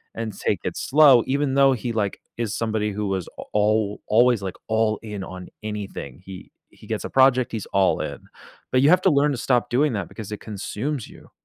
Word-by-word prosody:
and 110 -3 -5
take - - -1
it - - -3
slow 140 -5 +5
even 140 0 0
though 135 -1 +5
he, 120 -1 -3
like, 105 -3 -1 0.2
is 115 -4 -2
somebody 110 -2 -1
who 105 0 -3
was 95 -3 -2
a - - -6
al 105 0 +1
always, 120 0 +4
like, 95 -2 -5
all 110 -1 +1
in 105 -3 -6
on 95 -1 -8 0.2
anything. 105 -9 -6
He 95 -1 -10 0.2
he - - -17
gets - - -3
a - - -5
project, 130 -1 +4
he's 110 -4 -4
all 95 -1 +2
in. - - -5 0.5
But 130 - +3
you 140 - +5
have 180 +2 +5
to 190 - +5
learn 145 +1 +3
to 130 - -2
stop 125 0 +1
doing 140 +1 +2
that 100 -4 -3
because 110 -2 -9
it 105 - -5
consumes 110 +6 -4
you. - - -16
110 Hz, 215 wpm, -23 LUFS, 105-130 Hz, 0.5 s, slow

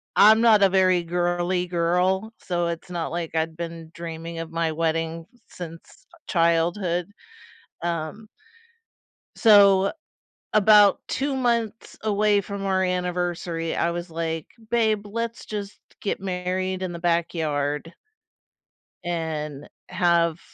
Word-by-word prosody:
I'm 220 +2 +7
not 220 -3 +6
a 195 - +6
very 185 -2 +3
girly 175 +1 0
girl, 180 +5 +1
so 175 -2 -2
it's 170 +2 -5
not 170 -2 -3
like 170 -1 -4
I'd 160 0 -1
been 165 -1 -7
dreaming 165 0 -6
of 165 - -5
my 165 -1 0
wedding 165 +1 -2 0.2
since 165 -2 -11 0.2
childhood. 170 +2 +1 0.7
Um 170 +5 -4 1.1
So 200 -3 +6 0.6
about 210 -1 +6
2 275 0 -1
months 235 -3 -1
away 210 -1 +2
from 200 0 -6
our 190 -1 +1
anniversary, 175 -2 -2
I 170 - +1
was 175 +1 -5
like, 165 -1 -3 0.2
"Babe, 220 -3 +1
let's 230 +2 -4
just 205 -1 -6 0.2
get 200 - -2
married 185 0 -2
in 185 -1 -3
the 170 - -6
backyard" 160 -3 -1 1.1
"and 155 -4 -4 0.2
have, 170 -2 +2
175 Hz, 115 wpm, -24 LUFS, 165-200 Hz, 1.1 s, I'm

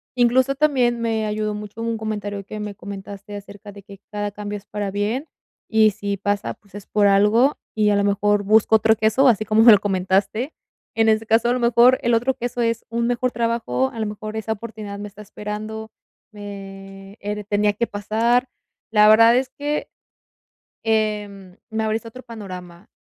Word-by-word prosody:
Incluso 255 +2 +3
también 260 -5 +2
me 225 -2 -1
ayudó 210 0 -2
mucho 210 +1 -8
un 230 0 -1
comentario 205 -2 -4
que 215 +2 -8
me 210 -1 -5
comentaste 200 +1 -9
acerca 205 0 -10
de 200 0 -13
que 200 -1 -13
cada 205 -1 -3
cambio 205 0 -5
es 200 - -14
para 205 -1 -4
bien, 210 +9 -2 0.4
y 220 -1 +4
si 200 0 -4
pasa, 205 +1 -2
pues, 200 -3 -28
es 205 -1 -10
por 210 -1 +2
algo, 210 +7 +4 0.2
y 210 -1 +3
a - - +3
lo 200 - +2
mejor 205 +1 +2
busco 220 +2 +4
otro 220 +1 +3
queso, 220 +5 +3
así 215 -3 +3
como 215 +1 +3
me 230 +1 +9
lo 205 - +7
comentaste. 195 - 0 0.4
En 225 0 +3
ese 220 0 +2
caso, 225 +2 +3
a - - +3
lo 250 - -1
mejor, 240 +2 +5
el 235 0 +2
otro 245 +4 +1
queso 245 -1 -4
es 230 -1 0
un 235 +1 -1
mejor 245 +1 0
trabajo, 230 - -1
a 230 - -7
lo 220 - -1
mejor 215 +1 -6
esa 220 0 -2
oportunidad 215 -2 -8
me 205 +1 -6
está 205 +1 -13
esperando, 210 +1 -7 0.4
me 195 -1 -10
eh, 205 +1 -3
re 210 - -6
tenía 205 0 +1
que 235 +3 -1
pasar. 230 +5 0 0.4
La 210 -1 +6
verdad 230 +2 +7
es 260 0 0
que, 290 +2 -3 1.0
em, 210 -4 -2
me 220 0 -1
abriste 220 +1 -2
otro 255 +3 -10
panorama, 185 -5 -10
215 Hz, 190 wpm, -22 LUFS, 205-230 Hz, 1.0 s, me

